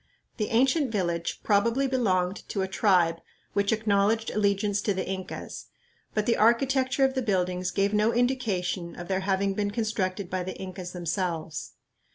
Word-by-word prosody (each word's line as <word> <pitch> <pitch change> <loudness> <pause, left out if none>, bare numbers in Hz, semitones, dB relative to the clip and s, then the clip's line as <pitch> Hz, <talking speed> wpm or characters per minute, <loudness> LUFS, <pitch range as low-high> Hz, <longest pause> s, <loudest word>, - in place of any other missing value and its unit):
The 210 -3 -1
ancient 265 +3 +2
village 170 -5 -2
probably 230 +6 +2
belonged 195 -8 +1
to 195 - -1
a - - -1
tribe 175 -3 +2 0.3
which 200 0 +1
acknowledged 220 0 +2
allegiance 205 0 +1
to 205 - 0
the 185 - -3
Incas, 190 0 -6 0.5
but 215 -1 +1
the 230 - +2
architecture 260 +4 +3
of 265 - +1
the 260 - -1
buildings 185 -4 0
gave 200 +2 0
no 210 +2 +3
indication 210 -9 -1
of 175 - -8
their 190 -1 0
having 195 0 0
been 205 +1 -1
constructed 205 -3 -2
by 185 +1 -2
the 185 +1 -5
Incas 185 -1 -7
themselves. 165 -5 -3
200 Hz, 160 wpm, -27 LUFS, 185-225 Hz, 0.5 s, architecture